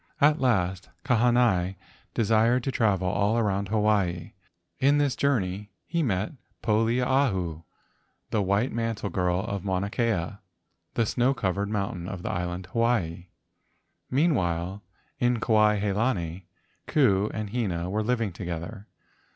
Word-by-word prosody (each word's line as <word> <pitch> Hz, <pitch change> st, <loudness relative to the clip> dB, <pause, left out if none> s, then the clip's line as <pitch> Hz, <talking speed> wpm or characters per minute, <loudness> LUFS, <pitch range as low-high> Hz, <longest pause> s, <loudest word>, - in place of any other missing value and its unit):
At 150 Hz, +1 st, +4 dB
last, 95 Hz, -7 st, +1 dB, 0.2 s
Kahanai 120 Hz, -7 st, +3 dB, 0.4 s
desired 115 Hz, +3 st, +3 dB
to 135 Hz, -, -1 dB
travel 100 Hz, -7 st, +1 dB
all 100 Hz, +4 st, +1 dB
around 100 Hz, -3 st, 0 dB
Hawaii. 105 Hz, -5 st, +1 dB, 0.5 s
In 140 Hz, +2 st, +4 dB
this 145 Hz, -3 st, +1 dB
journey 105 Hz, -7 st, 0 dB, 0.2 s
he 170 Hz, -, -1 dB
met 105 Hz, -, 0 dB, 0.3 s
Poliahu, 115 Hz, -, +1 dB, 0.7 s
the 110 Hz, -, +1 dB
white 100 Hz, +6 st, +1 dB
mantle 115 Hz, -3 st, -2 dB
girl 90 Hz, 0 st, +1 dB
of 100 Hz, -3 st, -4 dB
Mauna 95 Hz, +1 st, -1 dB
Kea, 105 Hz, -5 st, -1 dB, 0.6 s
the 115 Hz, -, +2 dB
snow 125 Hz, +4 st, +1 dB
cov¬ 95 Hz, -6 st, 0 dB
ered 100 Hz, +2 st, -2 dB
mountain 95 Hz, -4 st, -3 dB
of 90 Hz, -2 st, -6 dB
the -, -, -2 dB
island 90 Hz, +1 st, -3 dB
Hawaii. 95 Hz, -7 st, 0 dB, 0.8 s
Meanwhile, 95 Hz, -, 0 dB, 0.4 s
in 120 Hz, -1 st, +2 dB
Kuai 105 Hz, -2 st, +3 dB
he 100 Hz, 0 st, 0 dB
lani, 95 Hz, -6 st, -1 dB, 0.4 s
Ku 105 Hz, -8 st, +3 dB
and 110 Hz, -2 st, -4 dB
Hina 95 Hz, -8 st, -1 dB
were 105 Hz, +4 st, -1 dB
living 115 Hz, -2 st, 0 dB
together. 85 Hz, +4 st, -6 dB
105 Hz, 130 wpm, -27 LUFS, 95-120 Hz, 0.8 s, At